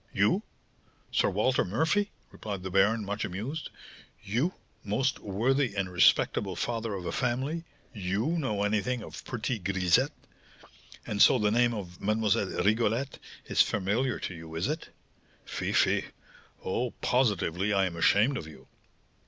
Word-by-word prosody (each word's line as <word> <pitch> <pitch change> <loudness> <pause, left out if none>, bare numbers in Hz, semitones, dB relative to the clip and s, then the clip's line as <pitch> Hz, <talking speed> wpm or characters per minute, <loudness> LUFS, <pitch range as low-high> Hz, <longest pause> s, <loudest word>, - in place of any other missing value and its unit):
"You! - - +2 0.7
Sir - - +2
Walter 110 +7 +2
Murphy," 160 - +1 0.2
replied 100 -4 -6
the 95 - -5
baron, 100 +3 +3
much 100 +1 -3
amused. 115 - -4 0.5
"You, 120 - 0 0.3
most 125 +6 0
worthy 120 +4 0
and 95 -2 -2
respectable 95 +1 +3
father 115 -3 -2
of 90 -2 -6
a - - -2
family! 135 +7 -1 0.3
you 100 +1 -1
know 130 -12 0
anything 110 +3 0
of - - -9
pretty 120 -1 -2
grisettes! 90 -2 +2 1.0
And 100 - -1
so 130 - +7
the 105 -3 +2
name 120 +1 +3
of 90 -4 -7
Mlle. 105 -3 +1
Rigolette 115 +5 +1 0.3
is - - +3
familiar 110 +6 +1
to - - -4
you, 80 -1 -9
is 80 - 0
it? 155 +3 -3 0.6
Fie, - - -3
fie! - - +3 0.6
Oh, 120 +6 0
positively 105 -6 +1
I 100 -1 +3
am 90 -2 -3
ashamed 105 +10 +3
of 80 - -6
you!" 80 - -14
105 Hz, 145 wpm, -29 LUFS, 95-125 Hz, 1.0 s, so